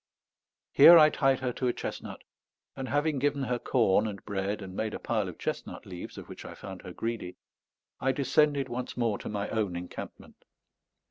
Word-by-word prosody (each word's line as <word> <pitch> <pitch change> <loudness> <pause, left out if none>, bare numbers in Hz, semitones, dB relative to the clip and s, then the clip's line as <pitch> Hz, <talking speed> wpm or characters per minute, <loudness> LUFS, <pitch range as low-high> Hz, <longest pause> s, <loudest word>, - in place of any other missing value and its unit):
Here 170 - +10
I 155 -1 +7
tied 135 -2 +2
her 125 -2 -1
to 130 - -2
a 120 - +1
chestnut, - - -6 0.5
and 135 -1 -5
having 145 0 +1
given 140 0 0
her 125 -1 -1
corn 110 -5 +2
and 100 -2 -7
bread 100 +1 -2
and 95 -1 -9
made 110 +1 -2
a - - -5
pile 110 -5 -1
of 90 - -10
chestnut - - -5
leaves, 90 -2 -8
of - - -9
which - - -10
I - - -9
found 95 -2 -9
her - - -9
greedy, 115 -3 -4 0.6
I 135 - +2
descended 140 +1 +2
once 125 0 -5
more 115 -4 0
to - - -6
my 105 -1 -2
own 105 -5 -1
encampment. 90 +1 -8
120 Hz, 190 wpm, -29 LUFS, 100-135 Hz, 0.6 s, Here